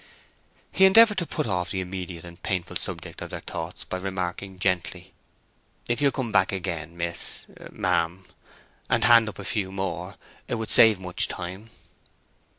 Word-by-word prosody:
He 190 - +5
endeavoured 210 +1 +7
to 170 - -3
put - - -2
off 90 -5 -1
the 95 - -2
immediate 90 -2 -6
and 85 0 -13
painful 90 -3 -3
subject - - -5
of - - -6
their - - -5
thoughts 85 +2 -6
by 95 - -4
remarking 95 0 -4
gently, 90 0 -2 0.7
"If 120 +3 0
you'll 140 - +5
come 130 -5 -3
back 95 -2 +3
again, 85 -4 -4
miss—ma'am, 85 +1 -2 0.6
and 115 - +3
hand 115 0 +6
up - - -10
a 100 - -7
few 100 -3 -1
more; 95 0 -4 0.3
it - - -1
would 110 -2 -3
save 110 -4 +7
much 90 -1 +1
time." 95 +5 -7
95 Hz, 155 wpm, -25 LUFS, 90-110 Hz, 0.7 s, endeavoured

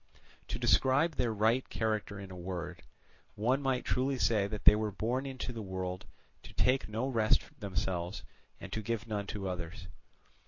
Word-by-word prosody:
To - - -2
describe 140 +5 +4
their 115 -2 0 0.3
character 110 -2 -1
in 95 -1 -8
a - - -7
word, 90 0 -5 0.5
one 125 +6 +2
might 135 -2 0
truly 130 +1 +1
say 105 -5 +3
that 105 0 -6
they - - +10
were 105 0 -1
born 120 +7 -1
into 130 -2 -4
the 115 - -5
world 95 -2 -4 0.3
to - - -13
take 130 -3 +2
no 115 +5 -1
rest 115 -5 +3 0.2
themselves 95 -2 -2 0.4
and - - -8
to 110 - -1
give 115 +1 -2
none 105 -3 -3
to 100 -3 -4
others. 90 +1 -5
105 Hz, 165 wpm, -32 LUFS, 95-125 Hz, 0.5 s, they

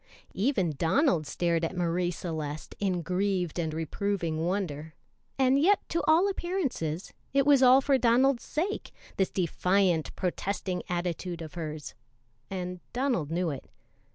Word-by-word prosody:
Even 195 - +1
Donald 165 - +2
stared 170 +1 0
at 170 +3 -2
Marie 175 0 +1
Celeste 155 -4 -5
in 185 -4 0
grieved 185 -1 -1
and 160 -2 -1
reproving 165 +1 -2
wonder, 160 -5 -2 0.4
and 265 0 +4
yet 390 +7 +3
to 335 - 0
all 325 +5 +5
appearances 310 - -2 0.2
it 275 -1 +4
was 285 -2 +6
all 260 +1 +7
for 270 -1 +2
Donald's 245 +2 +4
sake, 370 +7 -3 0.3
this 190 - +2
defiant, 180 -1 +1
protesting 185 0 -2
attitude 175 -1 -3
of 155 - -9
hers, 155 -3 -5 0.6
and 180 -1 -4
Donald 245 - 0
knew 170 0 0
it. 135 - -8
180 Hz, 135 wpm, -29 LUFS, 165-255 Hz, 0.6 s, all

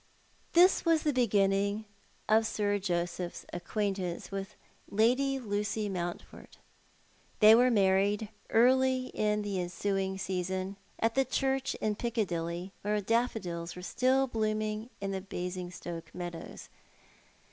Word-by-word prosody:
This 360 +2 +6
was 330 -2 +3
the 300 - +1
beginning 200 -3 +2 0.4
of 220 +1 +4
Sir 205 -1 0
Joseph's 175 -1 -3
acquaintance 190 -1 -3
with 195 0 -5 0.3
Lady 255 +6 +2
Lucy 210 -2 -2
Mountford. 175 -2 -6 0.8
They 215 0 +9
were 245 +2 +6
married 200 0 +2 0.2
early 255 +2 +3
in 210 0 +1
the 200 -2 -2
ensuiug 190 +2 -1
season, 185 +1 -3 0.2
at 225 0 +1
the 270 - +3
church 270 0 0
in 215 - -1
Piccadilly, 180 -6 -2
while 210 +1 0
daffodils 200 -6 -1
were 180 - -8
still 260 +6 +2
blooming 215 -1 -2
in 195 -1 -3
the 190 -1 -3
Basingstoke 180 -2 -6
meadows. 175 -2 -7
205 Hz, 115 wpm, -31 LUFS, 185-230 Hz, 0.8 s, They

